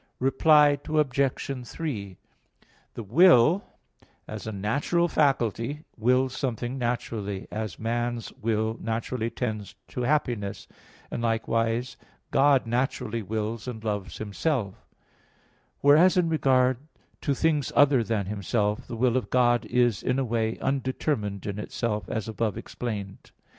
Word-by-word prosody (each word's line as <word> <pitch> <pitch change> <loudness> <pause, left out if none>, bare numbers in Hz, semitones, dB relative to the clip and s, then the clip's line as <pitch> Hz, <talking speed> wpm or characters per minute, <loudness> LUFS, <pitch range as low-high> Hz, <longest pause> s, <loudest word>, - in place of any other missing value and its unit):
Reply 145 +2 +4
Obj. 140 -3 0
3: 105 - -5 0.8
The 115 - -5
will, 165 - +5 0.6
as 110 0 -7
a - - -2
natural 140 - 0
faculty, 140 - 0
wills 125 +3 +2
something 125 0 -3
naturally, 110 -5 -3
as 110 0 -4
man's 120 +1 -2
will 110 0 0
naturally 115 +1 -2
tends 110 -5 -4
to 125 - -4
happiness; 120 -7 -1 0.4
and - - -3
likewise 115 +1 0 0.3
God 135 -1 +4
naturally 115 -1 -1
wills 110 +3 -3
and 110 -3 -6
loves 105 -3 -3
Himself; 110 0 -1 1.1
whereas 155 +7 +6
in 175 -2 +3
regard 130 -5 +3 0.4
to 140 - 0
things 150 -2 +1
other 140 -4 +5
than 110 -3 -1
Himself, 105 +1 -1
the 115 - -6
will 120 +1 +2
of 130 - -1
God 120 -1 +3
is 120 -5 +2
in 125 - 0
a 135 - 0
way, 115 -1 -1
undetermined 130 -6 -1
in 100 0 -4
itself, 105 0 -3
as 110 -1 -3
above 110 -1 -2
explained 100 -5 -5
(Q. - - -23
120 Hz, 125 wpm, -26 LUFS, 110-135 Hz, 1.1 s, whereas